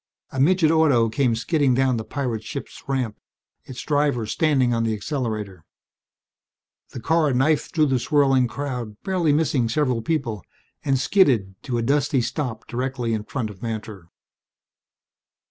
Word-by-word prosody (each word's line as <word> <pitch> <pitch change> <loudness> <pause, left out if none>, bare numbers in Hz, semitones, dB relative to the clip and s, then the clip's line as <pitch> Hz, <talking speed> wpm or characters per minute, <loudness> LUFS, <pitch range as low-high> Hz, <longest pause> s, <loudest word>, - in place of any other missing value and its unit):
A 130 - -4
midget 160 +2 +4
auto 145 -8 +4
came 115 +1 +1
skidding 140 +1 +1
down 130 -1 +2
the 110 - -3
pirate 120 -5 -3
ship's 120 +5 -7
ramp, 125 -6 -2 0.5
its 130 - -8
driver 145 -6 +1
standing 130 0 +2
on 115 0 0
the 110 -1 0
accelerator. 105 - -4 1.3
The - - -8
car 160 +3 +2
knifed 145 +4 +1
through 155 -2 +4
the 135 -3 +1
swirling 135 -1 +3
crowd, 125 -5 -5
barely 180 -5 +1
missing 145 -6 +1
several 125 -2 0
people, 115 - -2 0.4
and 135 -3 +2
skidded 130 - +3
to 125 -4 -3
a 115 - -1
dusty 140 +1 +2
stop 120 -3 -3
directly 125 -1 -2
in 105 -1 -3
front 115 -4 -3
of 95 -2 -15
Mantor. 110 -6 -6
130 Hz, 145 wpm, -23 LUFS, 115-145 Hz, 1.3 s, midget